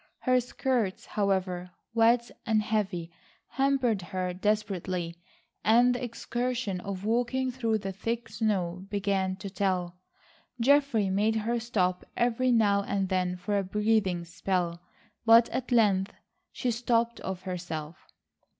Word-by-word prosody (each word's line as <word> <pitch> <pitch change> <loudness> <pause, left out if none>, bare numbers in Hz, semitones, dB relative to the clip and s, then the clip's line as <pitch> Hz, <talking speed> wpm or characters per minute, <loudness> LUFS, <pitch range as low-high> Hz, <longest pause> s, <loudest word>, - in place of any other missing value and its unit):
Her 255 -1 +3
skirts, 245 -5 -1
however, 185 -3 -1 0.2
wet 235 +1 +3
and 215 -1 +2
heavy, 195 -6 -1 0.4
hampered 265 -6 +1
her 180 +1 -3
desperately, 185 -4 -1 0.5
and 240 +3 +5
the 245 - -4
exertion 240 -3 -2
of 195 +1 -5
walking 245 +3 +1
through 230 -3 0
the 195 -2 -4
thick 230 +4 -3
snow 195 -5 -1
began 195 -2 0
to 200 +1 -8
tell. 180 -3 -1 0.6
Geoffrey 255 -6 +3
made 210 +3 +2
her 230 +2 0
stop 185 -6 0
every 245 +1 +2
now 205 -4 +4
and 195 -1 -1
then 180 -1 0
for 200 +3 -1
a - - -1
breathing 200 -3 +1
spell, 175 -1 -2 0.4
but 230 0 +7
at 255 -1 -4
length 200 -5 +3 0.4
she 250 - -1
stopped 235 0 0
of 190 -1 -5
herself. 170 -4 -6
210 Hz, 130 wpm, -28 LUFS, 185-235 Hz, 0.6 s, but